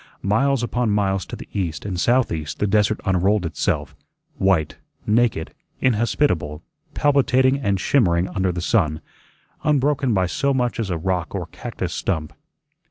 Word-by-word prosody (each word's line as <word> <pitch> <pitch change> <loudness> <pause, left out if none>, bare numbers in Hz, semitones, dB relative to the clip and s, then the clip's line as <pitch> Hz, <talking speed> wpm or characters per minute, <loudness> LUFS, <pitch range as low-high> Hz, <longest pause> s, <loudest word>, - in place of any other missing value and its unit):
Miles 125 +6 +2
upon 120 -1 0
miles 95 -3 0
to - - -6
the - - -10
east 85 -6 -3
and 95 -4 -3
southeast 90 - +1
the - - 0
desert 105 +1 +2
unrolled 95 +1 +2
itself, 75 -3 -2 0.4
white, 95 -6 +1 0.3
naked, 110 -6 +1 0.3
inhospitable, 105 - +1 0.3
palpitating 135 -2 +3
and 100 -7 0
shimmering 90 -8 +2
under 95 -2 0
the 90 0 -4
sun, 80 -6 +1 0.6
unbroken 145 -2 +2
by 95 -4 +2
so 135 - 0
much 125 -3 0
as 110 -4 -2
a 85 - -1
rock 90 0 -2
or - - -3
cactus - - -5
stump. 80 -5 -2
100 Hz, 145 wpm, -22 LUFS, 90-125 Hz, 0.6 s, palpitating